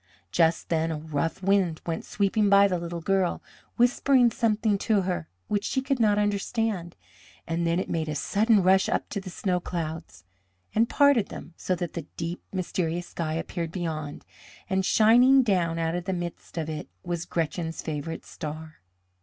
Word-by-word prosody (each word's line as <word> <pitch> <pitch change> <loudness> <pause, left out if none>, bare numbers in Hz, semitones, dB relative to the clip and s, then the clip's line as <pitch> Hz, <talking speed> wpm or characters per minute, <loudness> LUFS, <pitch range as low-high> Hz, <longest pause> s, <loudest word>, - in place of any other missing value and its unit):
Just 165 - +2
then 165 -1 +1
a 160 - -2
rough 160 +4 -3
wind 190 -4 +2
went 165 -1 -3
sweeping 205 +1 +1
by 200 0 +7
the 180 -3 -1
little 170 0 -5
girl, 190 0 +1 0.4
whispering 245 0 +4
something 220 -3 +1
to 210 -1 +2
her 180 -3 -3 0.2
which 205 -1 0
she 265 - 0
could 270 0 -1
not 210 -2 +3
understand, 205 -3 -1 0.5
and 170 0 -1
then 170 +1 +1
it - - -2
made 160 -2 -2
a 150 - -2
sudden 205 +8 +3
rush 190 +1 +4
up - - -1
to 200 - -3
the 190 - -8
snow 180 0 -1
clouds 160 - -5 0.5
and 230 +2 +3
parted 280 -7 +4
them, - - -9
so 185 - -1
that 175 -1 -4
the 165 -4 -6
deep, 170 +1 -4
mysterious 175 -2 -2
sky 155 -2 -3
appeared 165 0 -3
beyond, 160 -5 -4 0.4
and 190 0 0
shining 245 +5 +6
down 175 -7 +1
out 165 0 0
of 175 0 -3
the 190 - -1
midst 175 -1 -6
of 160 -2 -2
it 155 -7 -5
was 170 -1 -3
Gretchen's 165 0 -2
favourite 160 +1 -4
star. 155 0 -7
175 Hz, 175 wpm, -26 LUFS, 165-205 Hz, 0.5 s, by